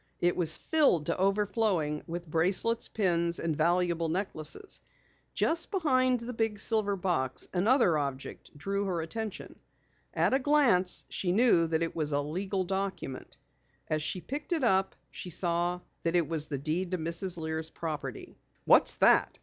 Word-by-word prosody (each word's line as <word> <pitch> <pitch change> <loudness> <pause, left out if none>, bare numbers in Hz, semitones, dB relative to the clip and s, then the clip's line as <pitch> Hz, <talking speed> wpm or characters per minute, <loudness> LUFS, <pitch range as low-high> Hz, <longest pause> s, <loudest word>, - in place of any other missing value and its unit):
It 175 0 +2
was 160 -3 +3
filled 285 - +2
to 170 - -1
overflowing 195 -6 +1
with 175 +1 -5
bracelets, 185 +9 +1
pins, 170 -4 0
and 165 -2 -1
valuable 170 +1 +1
necklaces. 185 - -4 0.5
Just 335 +1 0
behind 255 - +2
the 245 +2 -5
big 225 -2 -1
silver 205 -1 +1
box, 175 -9 -2
another 190 - +3
object 140 +1 -6
drew 200 +6 -2
her 180 -4 -1
attention. 215 +5 -6 0.6
At - - +2
a 265 - +4
glance 255 -11 +2
she 180 - -2
knew 195 -5 +4
that 160 0 0
it 165 - -3
was 150 -2 0
a 145 - +2
legal 185 +6 -2
document. 190 -8 -4 0.5
As 155 0 0
she 180 +4 -3
picked 295 - -4
it 320 -5 -1
up 190 -4 +2 0.2
she 180 - -8
saw 175 +1 -1 0.2
that 170 +1 -1
it 170 -4 +2
was 155 -2 -1
the 140 - -3
deed 160 +6 -2
to 185 - -1
Mrs. 170 +2 -2
Lear's 160 0 -4
property. 150 -7 -6 0.3
"What's - - +5
that?" - - +4
180 Hz, 160 wpm, -30 LUFS, 160-210 Hz, 0.6 s, What's